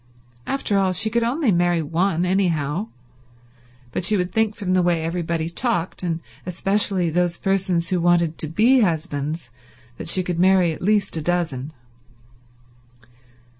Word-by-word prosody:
After 215 -7 0
all, 190 -1 +1
she 220 +3 +1
could 235 +1 +1
only 250 +1 +1
marry 175 -2 +2
one, 170 +3 0
anyhow; 180 -1 0 1.0
but 175 - 0
you 210 - +2
would 180 0 -2
think 220 -1 +1
from 185 -4 -2
the 185 - +3
way 175 -2 +1
everybody 165 -1 -2
talked, 175 0 -2
and 170 -2 -2 0.2
especially 185 -1 0
those 175 +1 0
persons 185 -3 0
who 180 -2 0
wanted 170 -2 +2
to 155 - -2
be 230 - +4
husbands, 155 - -2 0.5
that - - -6
she 185 +1 +2
could 175 -1 -3
marry 185 -2 +4
at 155 - -7
least 205 -2 +1
a - - -2
dozen. 155 -5 -2
175 Hz, 150 wpm, -22 LUFS, 165-195 Hz, 1.0 s, be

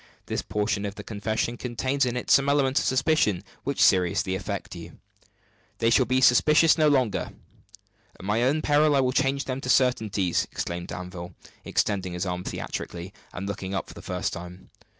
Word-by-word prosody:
This - - -2
portion 105 -1 -1
of 100 - -7
the - - -8
confession 110 +2 -2
contains 130 +3 -1
in 125 0 -2
it 125 - -3
some 140 0 +5
elements 140 -2 +2
of - - -1
suspicion 130 - +2 0.2
which - - -3
seriously 90 0 +3
affect 100 0 -4
you 85 -1 -10 0.4
" - - -37
"They 115 - +2
shall 125 +1 +4
be 130 +1 +2
suspicions 150 +6 +5
no 155 -2 +3
longer 130 -7 +1 0.9
at - - -10
my 105 +3 +1
own 145 +5 +1
peril 150 0 +3
I - - +4
will 130 -1 +2
change 135 +1 0
them 130 0 -4
to 125 - -5
certainties!" 110 -9 +2
exclaimed 85 0 -4
Danville, 90 -1 -7 0.3
extending 95 -3 -1
his 90 +2 -3
arm 90 -1 -3
theatrically, 90 +1 -6 0.2
and 95 +2 -6
looking 95 -1 -4
up - - -3
for - - -10
the - - -11
first - - -3
time. 90 +2 -9
110 Hz, 185 wpm, -26 LUFS, 95-130 Hz, 0.9 s, some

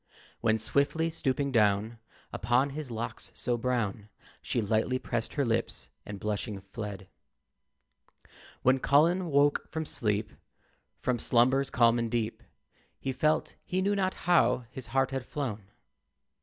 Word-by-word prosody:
When 110 -1 +2
swiftly 140 +8 +1
stooping 140 -2 -1
down 110 0 +2 0.3
Upon 125 +5 +2
his 150 -1 -5
locks 115 0 -5
so 120 0 -1
brown 115 -4 -1 0.3
She - - -1
lightly 110 +4 +1
pressed 120 -2 -3
her 140 -2 +1
lips, 115 -1 -2 0.2
and 100 -1 -6
blushing 105 0 -3
fled. 100 -1 -7 1.6
When 130 +1 +4
Colin 170 +7 +3
woke 145 -1 +3
from 160 0 -3
sleep, 105 -5 -1 0.7
From 125 -2 -1
slumbers 130 +4 +3
calm 115 -1 +4
and 115 -1 -1
deep, 115 -1 -2 0.6
He 135 - -2
felt 155 +4 +1
he 185 - -2
knew 200 +2 +2
not 190 -1 0
how 170 -8 +4
his 130 -1 -8
heart 135 0 +1
had 135 -1 -2
flown. 120 -7 -4
125 Hz, 135 wpm, -29 LUFS, 110-140 Hz, 1.6 s, When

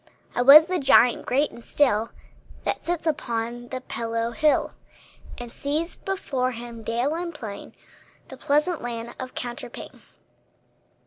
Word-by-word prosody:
I - - 0
was 285 +5 +10
the 365 0 -1
giant 250 -3 +4
great 280 +4 +1
and 235 - -13
still 230 -6 +1 0.5
That - - -2
sits 345 -1 -2
upon 240 -5 -2
the 255 +1 -5
pillow 230 -1 -3
hill, 300 +5 +2 0.6
And 240 -1 -8
sees 305 +7 -3
before 270 -10 -2
him, 235 0 -8
dale 235 +6 -1
and 340 +1 -3
plain, 220 -10 -9 0.5
The - - -8
pleasant 300 +4 +1
land 235 -1 -5
of 255 -1 -7
counterpane. 240 0 -7
250 Hz, 135 wpm, -25 LUFS, 235-300 Hz, 0.6 s, was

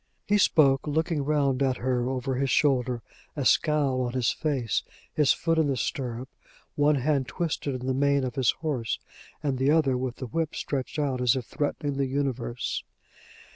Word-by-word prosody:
He 205 +1 +3
spoke 140 -7 +4
looking 160 0 0
round 140 -2 +1
at 130 -2 +2
her 125 0 0
over 130 0 -2
his 135 +1 0
shoulder, 125 -5 +2 0.3
a 145 -4 -2
scowl 145 -4 +3
on 120 -1 -2
his 120 -6 +1
face, 135 -8 -1 0.3
his 150 -3 +4
foot 165 -1 +1
in 155 - +3
the 135 -2 0
stirrup, 125 -1 -3 0.5
one 145 +1 +3
hand 135 -1 +1
twisted 155 -5 -2
in 125 0 -5
the 130 - +1
mane 140 +1 +2
of 125 -2 -2
his 130 -4 +1 0.2
horse, 125 -7 -1 0.5
and 135 -3 -1
the 135 +2 +2
other 150 -4 +3
with 125 -1 -2
the 130 - -6
whip 155 +6 -2
stretched 135 +1 -3
out 135 -4 0
as 125 -1 +4
if 130 -3 -3
threatening 145 0 -2
the 135 -1 +1
universe. 130 -3 -2
135 Hz, 180 wpm, -27 LUFS, 125-145 Hz, 0.5 s, spoke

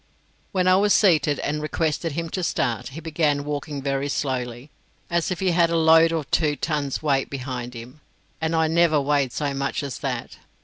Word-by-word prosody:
When 185 -1 +1
I 185 0 +6
was 205 +1 +4
seated 155 -7 +3
and 150 +1 -2
requested 155 +1 -1
him 165 +2 -3
to 185 - -3
start, 120 -8 -1
he 140 +4 -8
began 150 -3 0
walking 145 -1 -4
very 140 0 -1
slowly, 125 -1 -3 0.4
as 170 -1 +1
if 185 -1 -3
he 185 -2 +2
had 170 -1 +3
a 170 - +1
load 160 0 +6
of 160 -3 -3
two 150 -2 +2
tons 150 -2 -2
weight 135 -3 +1
behind 125 -2 -5
him, 125 +6 -10 0.4
and 160 +1 0
I 160 0 +3
never 165 -1 +3
weighed 140 -2 +1
so 145 +1 -2
much 135 +1 -2
as 140 -3 -5
that. - - -4
150 Hz, 190 wpm, -23 LUFS, 140-165 Hz, 0.4 s, I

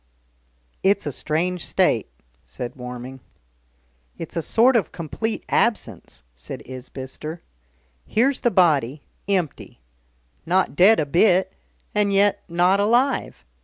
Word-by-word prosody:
"It's 200 +1 +2
a 145 - -2
strange 170 +6 -2
state," - - +1 0.4
said 120 - -7
Warming. 125 +1 -8 1.0
"It's 165 - -8
a 165 - 0
sort 240 +9 +3
of 225 - +1
complete 215 +7 -4
absence," 165 - -1
said - - -9
Isbister. 130 +5 -8 0.6
"Here's 260 +5 +1
the 240 - +3
body, 150 - +2 0.2
empty. 180 - -2 0.6
Not 185 -2 +1
dead 200 +7 +6
a 150 - +1
bit, 180 +5 +3 0.4
and 205 -1 +1
yet 200 +1 +3
not 180 +3 +3
alive. 240 - +1
175 Hz, 115 wpm, -22 LUFS, 135-205 Hz, 1.0 s, dead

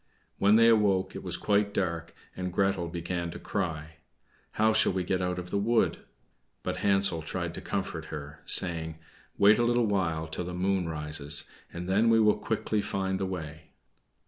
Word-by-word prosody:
When 100 +2 +5
they 115 +1 +6
awoke 100 -4 +3
it - - -5
was - - -4
quite 100 0 +1
dark, 85 -4 -2 0.2
and 90 0 -4
Gretel 95 -2 0
began 85 +1 -3
to - - -7
cry, 80 -5 -4 0.6
"How 110 0 +3
shall 110 -3 +3
we 95 -1 -1
get 95 +1 -1
out 90 0 -1
of 90 0 -6
the 100 - +1
wood?" 115 +3 +1 0.6
But - - -3
Hansel 100 -4 +2
tried 85 +1 -4
to - - -7
comfort 85 -4 -3
her, 75 -2 -8
saying, 80 -3 +2 0.4
"Wait 105 +2 +6
a - - +3
little 120 0 +2
while 85 -6 0
till 80 +2 -5
the 90 0 -5
moon 95 -1 0
rises, 75 -1 -1 0.2
and 85 +1 -6
then 105 +5 +3
we 115 0 +5
will 105 -1 +4
quickly 110 -1 -1
find 95 -2 -2
the 95 - -1
way." 80 -4 -7
95 Hz, 180 wpm, -28 LUFS, 85-100 Hz, 0.6 s, they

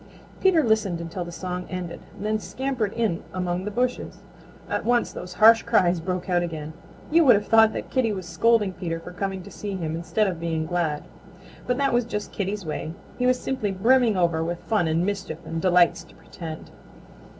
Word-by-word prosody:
Peter 365 -5 +4
listened 215 -7 +1
until 170 +2 -5
the 175 - -8
song 180 +1 -5
ended, 180 -2 -5 0.2
then 215 +2 -1
scampered 255 -3 -2
in 220 -8 0
among 180 0 -2
the - - -2
bushes. 250 +4 -2 0.5
At - - -2
once 240 0 +2
those 180 - -7
harsh 225 +3 +7
cries 180 -6 +2
broke 180 +2 -3
out 175 -2 +2
again. 160 -3 -5 0.4
You 335 +2 +6
would 260 -7 +7
have 205 - 0
thought 225 0 +6
that - - -6
Kitty 255 -4 +2
was 190 -3 -4
scolding 225 -1 +2
Peter 170 -3 -4
for 165 - -10
coming 190 0 -4
to - - -11
see 205 -2 -5
him 160 -3 -3
instead 170 +6 0
of 180 -4 -2
being 165 -1 -1
glad. 165 -3 -1 0.6
But 250 - +1
that 275 -2 +1
was 240 -1 +2
just 210 -3 -4
Kitty's 200 -1 -3
way. 155 +1 -4 0.3
He 250 - +1
is 255 0 +3
simply 260 -6 -2
brimming 225 +3 +3
over 170 -2 +2
with 170 +1 -4
fun 210 -7 +1
and 165 +2 +1
mischief, 195 -6 -3
and 165 0 -4
delights 175 -2 +4
to - - -19
pretend. 160 -2 -9
185 Hz, 195 wpm, -25 LUFS, 170-225 Hz, 0.6 s, harsh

